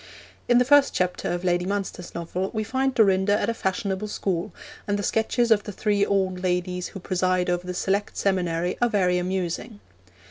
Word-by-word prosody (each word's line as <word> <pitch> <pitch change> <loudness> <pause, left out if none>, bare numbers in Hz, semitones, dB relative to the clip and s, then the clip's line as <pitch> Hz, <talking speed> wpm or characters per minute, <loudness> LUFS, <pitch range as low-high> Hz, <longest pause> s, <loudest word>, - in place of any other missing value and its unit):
In 245 - +5
the 250 - +4
first 290 +1 +5
chapter 180 -1 -1
of 175 +1 -3
Lady 175 -1 +1
Munster's 195 -3 -4
novel 175 +3 -3
we 215 - 0
find 265 +3 -1
Dorinda 205 -1 +3
at 205 - 0
a - - -3
fashionable 190 0 -2
school, 195 -1 -2 0.4
and 205 0 0
the 205 - -3
sketches 230 +2 +1
of 215 -2 +5
the 210 - -5
three 205 0 +1
old 190 -2 0
ladies 180 0 -1
who 195 - -9
preside 185 0 0
over 175 0 -2
the 180 - -4
select 200 +3 -1
seminary 180 -3 0
are 240 - +4
very 180 -4 +2
amusing. 185 +4 -3
190 Hz, 185 wpm, -25 LUFS, 180-210 Hz, 0.4 s, In